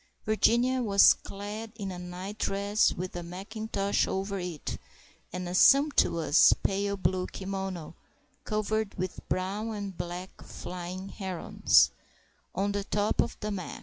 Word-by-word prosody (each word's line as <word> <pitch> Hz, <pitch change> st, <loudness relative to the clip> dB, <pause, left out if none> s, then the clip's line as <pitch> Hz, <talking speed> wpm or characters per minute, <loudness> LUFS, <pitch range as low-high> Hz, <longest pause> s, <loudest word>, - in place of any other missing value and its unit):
Virginia 240 Hz, +4 st, +3 dB
was 200 Hz, -4 st, +7 dB
clad 210 Hz, +3 st, -7 dB
in 200 Hz, -3 st, -5 dB
a 180 Hz, -, -6 dB
nightdress, 195 Hz, +3 st, 0 dB
with 180 Hz, +1 st, -5 dB
a 175 Hz, -, -3 dB
mackintosh 200 Hz, +3 st, -2 dB
over 195 Hz, +1 st, -2 dB
it 175 Hz, -4 st, -5 dB, 0.5 s
and 180 Hz, 0 st, -4 dB
a 175 Hz, -, -4 dB
sumptuous 185 Hz, -, +5 dB
pale 200 Hz, +1 st, 0 dB
blue 185 Hz, -1 st, 0 dB
kimono 190 Hz, -4 st, -5 dB, 0.5 s
(covered 215 Hz, 0 st, -1 dB
with 185 Hz, 0 st, -4 dB
brown 195 Hz, +4 st, -2 dB
and 200 Hz, -2 st, -5 dB
black 180 Hz, +2 st, -6 dB
flying 180 Hz, +2 st, -7 dB
herons) 190 Hz, -4 st, +2 dB, 0.6 s
on 200 Hz, +2 st, 0 dB
the 200 Hz, 0 st, -2 dB
top 205 Hz, +1 st, +1 dB
of -, -, -3 dB
the 210 Hz, 0 st, -2 dB
mac. 190 Hz, -3 st, -5 dB
195 Hz, 130 wpm, -29 LUFS, 180-210 Hz, 0.6 s, was